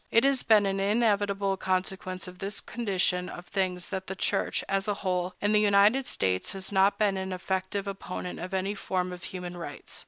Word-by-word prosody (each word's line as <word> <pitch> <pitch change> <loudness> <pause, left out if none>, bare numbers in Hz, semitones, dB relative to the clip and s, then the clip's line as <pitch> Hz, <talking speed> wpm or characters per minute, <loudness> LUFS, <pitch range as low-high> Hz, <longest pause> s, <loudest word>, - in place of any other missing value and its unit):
It 230 - +5
has 275 -1 +3
been 215 -2 +5
an 195 0 0
inevitable 200 -2 +2
consequence 185 0 -2
of 180 0 -11
this 195 +1 -3
condition 190 -5 0
of 175 - -8
things 185 -2 -2
that 190 -1 -3
the 190 - -4
Church, - - 0
as 195 +1 0
a 205 - +1
whole, 180 -2 -1
in 205 - +1
the 210 0 +5
United 210 +6 +4
States 95 - 0
has 190 0 -5
not 195 +1 +4
been 205 -2 +2
an 190 0 -3
effective 190 +2 -2
opponent 190 -2 -5
of 180 +2 -5
any 190 +1 0
form 185 -2 -2
of 180 +1 -8
human 180 -1 -6
rights. 175 - -6
195 Hz, 195 wpm, -28 LUFS, 185-205 Hz, -, It